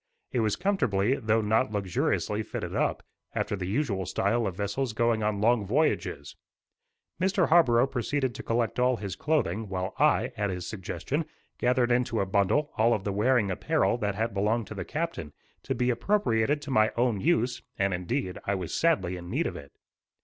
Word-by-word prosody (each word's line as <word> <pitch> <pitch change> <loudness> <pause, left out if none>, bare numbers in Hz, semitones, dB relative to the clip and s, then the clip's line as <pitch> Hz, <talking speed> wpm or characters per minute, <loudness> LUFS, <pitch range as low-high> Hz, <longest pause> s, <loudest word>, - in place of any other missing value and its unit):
It 125 - 0
was 110 -2 +1
comfortably, 125 - +1
though 110 -2 +1
not 110 +2 +1
luxuriously 105 +1 -1
fitted - - -5
up, - - 0 0.3
after - - -1
the 90 -2 -4
usual 100 - -1
style 110 +3 +1
of 95 - -4
vessels 110 +5 -2
going 115 0 +1
on 105 -1 0
long 115 0 +3
voyages. 100 - -1 0.9
Mr. 190 -2 +2
Harborough 130 -8 +5
proceeded 135 0 -1
to - - -7
collect 115 +1 -1
all 125 0 +3
his 100 -4 -5
clothing, 110 - -1
while 95 -1 -3
I, - - +3
at 105 -1 -1
his 90 -2 -4
suggestion, 120 - -3 0.3
gathered 125 0 +2
into 120 -2 +1
a 100 - +1
bundle 100 +10 +1
all 115 +2 +4
of 100 - -5
the 100 - -2
wearing 110 -1 +2
apparel 155 - +1
that 105 -2 -1
had 115 +1 -1
belonged 105 +3 +1
to - - -5
the 95 -4 -5
captain, 155 - -4 0.3
to - - -3
be 125 0 +1
appropriated 140 - +1
to 145 - -6
my 110 -3 +4
own 120 -4 +2
use; 125 -6 +1 0.2
and 100 -1 +1
indeed, 90 +2 -2
I 100 - 0
was 90 -3 -4
sadly 95 - +1
in 85 0 -9
need - - 0
of - - -3
it. 70 -1 -10
110 Hz, 185 wpm, -28 LUFS, 100-130 Hz, 0.9 s, Harborough